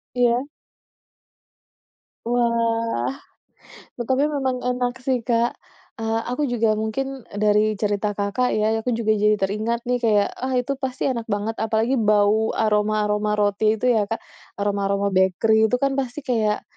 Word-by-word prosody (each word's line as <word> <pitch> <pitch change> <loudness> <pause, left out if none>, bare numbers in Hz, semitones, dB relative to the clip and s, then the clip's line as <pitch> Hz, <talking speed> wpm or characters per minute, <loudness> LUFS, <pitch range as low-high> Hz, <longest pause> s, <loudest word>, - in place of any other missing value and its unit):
Iya. 245 +1 +2 1.8
Wah. 230 - 0 0.9
Tetapi, 260 +4 +1
memang 265 -3 -2
enak 250 0 -2
sih, 260 -2 +1
Kak. 235 0 +2 0.5
Eee, 225 0 0
aku 255 +4 -2
juga 230 -3 +1
mungkin 265 +4 -4 0.2
dari 210 +1 +3
cerita 205 0 -1
Kakak 205 +5 0
ya, 215 +1 +1
aku 240 +1 -1
juga 225 -2 0
jadi 210 0 +3
teringat 215 +4 -2
nih 250 0 0
kayak, 215 -4 +3
ah 260 0 -2
itu 250 +2 0
pasti 265 -1 -3
enak 235 -3 -4
banget, 210 +1 -2
apalagi 220 +3 +1
bau 215 0 +2
aroma-aroma 210 0 +1
roti 210 +1 +2
itu 220 - -4
ya, 215 -4 +1
Kak. 225 - -3 0.4
Aroma-aroma 200 0 0
bakery 205 +4 +3
itu 250 - +1
kan 275 - +2
pasti 260 +1 -4
kayak, 220 -4 0
220 Hz, 140 wpm, -22 LUFS, 210-245 Hz, 1.8 s, dari